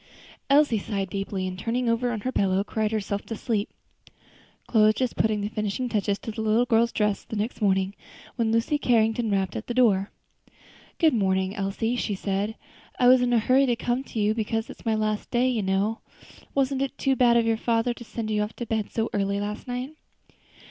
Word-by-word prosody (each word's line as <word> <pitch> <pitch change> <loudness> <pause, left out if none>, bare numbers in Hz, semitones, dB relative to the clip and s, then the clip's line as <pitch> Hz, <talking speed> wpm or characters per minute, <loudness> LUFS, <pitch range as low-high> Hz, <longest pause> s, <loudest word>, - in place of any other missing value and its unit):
Elsie 280 -5 +4
sighed 195 -2 -3
deeply, 195 -1 -3
and 185 0 -6
turning 240 +4 -1
over 230 +1 +1
on 220 -3 -3
her 255 - -2
pillow, 195 -4 +1
cried 215 +1 -1
herself 205 -2 -2
to 225 - -6
sleep. 220 -3 -2 1.0
Chloe 220 -3 +4
was 215 0 +4
just 255 -1 -1
putting 215 -1 +1
the 205 - -1
finishing 215 +3 -2
touches 205 -3 0
to 225 - -6
the 220 - -5
little 220 +2 +2
girl's 235 -1 +3
dress 210 -2 0
the - - -7
next 215 +3 -3
morning, 190 -1 +2 0.4
when 230 -3 0
Lucy 230 +6 +1
Carrington 225 -2 +2
rapped 195 -2 0
at 220 - -5
the 240 - -3
door. 205 -6 +3 0.9
"Good 320 -3 +4
morning, 190 -2 +1
Elsie," 205 +4 -1
she 210 -4 -1
said; 200 +3 -2 0.4
"I 245 - +4
was 255 0 +6
in 245 0 +1
a 240 - +4
hurry 260 +5 +3
to 240 - +2
come 245 +2 -1
to 225 - -5
you, 210 +1 +2
because 225 0 -2
it - - -13
is - - -18
my 220 - +2
last 215 -1 -1
day, 245 +1 +2
you 245 -4 0
know. 195 +3 0 0.6
Wasn't 270 -1 +1
it 275 0 -2
too 270 -1 +1
bad 240 -2 +4
of 230 - +3
your 225 0 +2
father 230 +1 +1
to 235 - -11
send 220 -1 -5
you 210 0 +1
off 210 +1 -3
to 240 - -5
bed 220 -2 -2
so 225 0 -1
early 200 0 0
last 210 +3 -5
night?" 250 +3 -4
220 Hz, 215 wpm, -25 LUFS, 205-240 Hz, 1.0 s, was